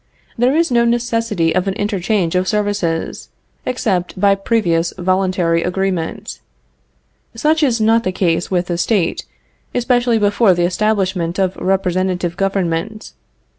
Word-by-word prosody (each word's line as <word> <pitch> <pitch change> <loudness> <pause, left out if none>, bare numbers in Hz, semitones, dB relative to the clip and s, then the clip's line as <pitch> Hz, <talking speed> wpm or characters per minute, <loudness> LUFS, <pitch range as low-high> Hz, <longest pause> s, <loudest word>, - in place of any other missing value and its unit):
There 250 +4 +2
is 330 -3 +2
no 235 -1 +4
necessity 230 -7 0
of 185 +1 0
an 195 - -1
interchange 200 -3 -1
of 185 0 0
services, 205 -6 -2 0.4
except 190 -8 -1
by 200 0 +4
previous 190 -5 0
voluntary 185 -2 +1
agreement. 180 -2 -3 1.0
Such 310 +7 +1
is 250 -6 +2
not 225 +1 +3
the 185 - -1
case 175 -2 0
with 180 -2 0
the 175 -1 -3
State, 195 -1 0 0.5
especially 245 -1 +2
before 205 -1 +3
the 175 0 +1
establishment 185 -3 0
of 190 -1 0
representative 185 -2 -1
government. 195 +2 -2
195 Hz, 130 wpm, -17 LUFS, 180-225 Hz, 1.0 s, no